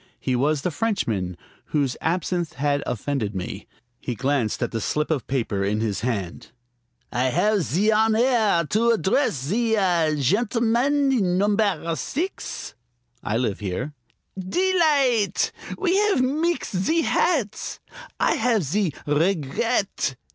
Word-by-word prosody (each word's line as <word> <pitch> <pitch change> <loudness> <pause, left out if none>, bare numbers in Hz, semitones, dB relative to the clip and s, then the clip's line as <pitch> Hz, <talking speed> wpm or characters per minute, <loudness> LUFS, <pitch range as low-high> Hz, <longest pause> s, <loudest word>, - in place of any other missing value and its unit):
He 130 - -1
was 145 +3 +1
the 180 - 0
Frenchman 115 - -1 0.3
whose 140 -5 0
absinthe 175 0 -1
had 145 +2 0
offended 115 -4 -2
me. 90 -1 -5 0.3
He 125 - -4
glanced 130 -3 0
at 120 - -2
the 115 - -3
slip 150 +8 -1
of 145 -6 -1
paper 115 -7 -1
in 105 +2 0
his 110 -3 -1
hand. 100 -8 -3 0.6
"I 125 +2 0
have 205 - +2
zee 175 - +1
honaire 220 -5 +3
to 230 +3 +2
address 230 +4 +2
zee 215 - 0
ah 170 -6 +2
gentleman 235 - +2
in 190 -8 +1
numbaire 200 -4 +1
six?" 340 - -4 0.5
"I 105 - -1
live 115 -5 -1
here." 105 +9 -4 0.5
"Delight'! 275 - +2 0.3
We 370 -1 +1
have 415 -7 +3
meexed 305 - 0
zee 320 - +1
hats, 255 - 0 0.4
I - - +3
have 225 -4 +2
zee 170 +2 0
r 145 - 0
r 145 - +2
regret. 190 - 0
180 Hz, 135 wpm, -24 LUFS, -, 0.6 s, honaire